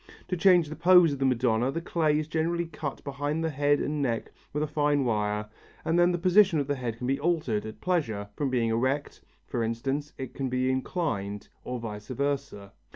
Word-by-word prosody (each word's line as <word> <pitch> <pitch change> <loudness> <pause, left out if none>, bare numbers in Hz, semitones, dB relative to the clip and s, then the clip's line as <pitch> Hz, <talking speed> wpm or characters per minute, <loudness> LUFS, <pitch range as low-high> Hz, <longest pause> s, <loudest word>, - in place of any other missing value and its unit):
To 180 - 0
change 175 -2 +5
the 155 - -6
pose 175 -2 +6
of 140 - -5
the 135 - +2
Madonna 125 0 +2
the 165 - -2
clay 160 -3 +1
is 155 0 -2
generally 165 +2 0
cut 150 -3 -6
behind 145 +3 -2
the 160 - 0
head 145 0 +2
and 150 0 -1
neck 115 -4 -1 0.2
with 150 +1 -1
a - - -1
fine 145 -2 +1
wire 105 -2 0 0.4
and 165 +2 +2
then 175 +1 +5
the 175 - 0
position 185 0 +4
of 140 - 0
the 145 - 0
head 120 -4 -4
can 125 - -5
be 135 +2 0
altered 145 -10 0
at 110 - -10
pleasure; 115 - -1
from 145 -2 -1
being 120 -3 +1
erect, 130 +6 -1 0.2
for 120 -4 -2
instance, 135 +6 -2
it 130 -2 -6
can 135 -2 -3
be 130 +1 +1
inclined, 130 - -2
or 125 - -4
vice 105 -3 -7
versa. 135 -7 -3
140 Hz, 210 wpm, -28 LUFS, 120-160 Hz, 0.4 s, pose